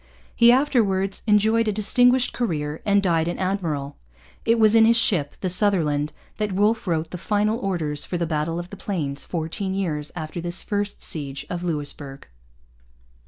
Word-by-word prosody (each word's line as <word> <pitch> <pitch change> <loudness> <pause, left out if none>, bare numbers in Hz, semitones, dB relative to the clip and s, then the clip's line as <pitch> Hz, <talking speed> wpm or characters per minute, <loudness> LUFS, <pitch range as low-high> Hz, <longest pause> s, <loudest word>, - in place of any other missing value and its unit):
He 235 0 +6
afterwards 215 -8 +2
enjoyed 220 +2 +3
a - - +2
distinguished 245 +5 +3
career 155 -10 -3
and 200 0 +3
died 165 -3 +1
an 175 - -3
admiral. 165 -7 -3 0.5
It 230 +1 +3
was 215 -1 +5
in 225 -1 +6
his 230 +1 +5
ship, 170 -11 +1
the 190 - -1
Sutherland, 160 -7 +2 0.3
that 210 -2 -2
Wolfe 215 +3 +1
wrote 160 -2 -1
the 180 - -6
final 210 +4 0
orders 160 - -1
for 180 - -4
the 170 - -1
Battle 160 +1 -2
of 175 +1 -6
the 200 - -8
Plains 150 -9 -3
fourteen 180 +3 -4
years 155 -6 -2
after 160 0 -5
this 175 +2 -2
first 205 -1 -3
siege 140 -5 -2
of 175 0 -4
Louisbourg. 145 -4 -4
185 Hz, 165 wpm, -23 LUFS, 155-210 Hz, 0.5 s, He